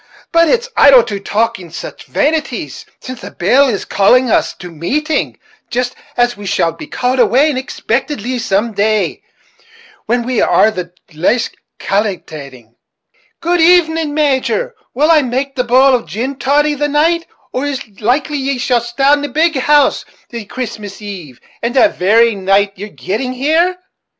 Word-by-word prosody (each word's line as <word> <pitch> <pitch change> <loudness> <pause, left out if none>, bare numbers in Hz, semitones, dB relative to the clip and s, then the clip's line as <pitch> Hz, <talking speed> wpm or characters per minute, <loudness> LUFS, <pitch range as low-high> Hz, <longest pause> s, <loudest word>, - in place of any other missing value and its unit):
but 335 0 +4
it's 485 0 +1
idle 270 -4 +7
to 205 -2 -5
talk 225 +3 -1
of 170 -2 -11
sich - - -8
vanities, 305 +1 -2 0.2
while 255 - -5
the - - -9
bell 255 +10 +3
is 215 -6 -2
calling 245 +5 +3
us - - +1
to 180 -1 -10
mateing 290 - -2 0.3
jist 245 +1 -2 0.2
as 245 0 +2
we 205 - -11
shall 170 -3 0
be 165 - -10
called 255 +1 -1
away 275 +5 +4
unexpictedly 255 -1 -3
some 220 +1 0
day, 215 +1 0 0.9
when 240 +1 +1
we 250 -2 0
are 220 - +4
the 180 -4 -6 0.2
laist 205 +10 0 0.2
calkilating. 155 - -4 0.7
Good 345 +1 +1
even, 325 -3 +3
Major; 305 - 0 0.2
will 300 +5 +3
I 315 -2 +5
make 270 +2 -3
the 250 - 0
bowl 260 +3 +4
of 245 -2 0
gin 260 +6 -4
toddy 295 +4 +2
the 295 +1 -1
night, 325 +4 +1 0.3
or 265 +3 -1
it's 275 -4 -4
likely 275 +6 0
ye'll 255 -2 0
stay 240 +3 -4
at 290 +1 +4
the 290 - -4
big 315 +4 +1
house 290 +2 +3 0.3
the 230 -3 -6
Christmas 210 -4 -6
eve, 180 - -9 0.2
and 235 +2 -2
the 310 +4 +5
very 225 +4 +3
night 195 +1 +1
of 200 - -34
yer 205 - -5
getting 215 - -4
there?" 330 +6 +2
250 Hz, 160 wpm, -15 LUFS, 210-290 Hz, 0.9 s, idle